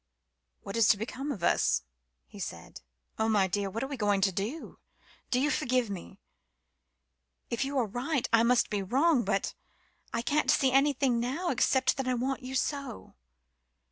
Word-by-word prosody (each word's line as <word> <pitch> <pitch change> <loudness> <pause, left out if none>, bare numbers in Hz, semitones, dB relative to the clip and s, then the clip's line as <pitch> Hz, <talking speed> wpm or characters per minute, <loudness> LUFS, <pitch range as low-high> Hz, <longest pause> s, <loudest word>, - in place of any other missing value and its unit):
"What 195 - -6
is 230 -2 +4
to 205 - +5
become 255 +7 -4
of 190 -10 -6
us?" 60 - +2 0.4
he 205 - -13
said. 85 - -7 0.4
"Oh, 220 0 +2
my 205 -3 +3
dear 200 +1 -1
what 225 +5 -4
are - - -2
we 275 -1 -5
to 205 -3 +2
do? 215 - -5 0.5
Do 250 - +2
you 295 +3 +2
forgive 250 -7 0
me? 185 -3 -8 1.3
If 235 +2 0
you 275 +1 -3
are 250 - +2
right, 250 +6 -2
I 230 - +6
must 235 +1 +3
be 205 -1 0
wrong 260 - +2
but 195 0 -1 0.6
I 230 - -2
can't 300 +4 +1
see 265 -3 +4
anything 270 -2 +3
now 275 +10 -1
except 260 +2 +2
that 270 -1 -2
I 255 - +1
want 260 +3 -2
you 260 +1 -6
so." 275 - -3
245 Hz, 170 wpm, -29 LUFS, 205-270 Hz, 1.3 s, I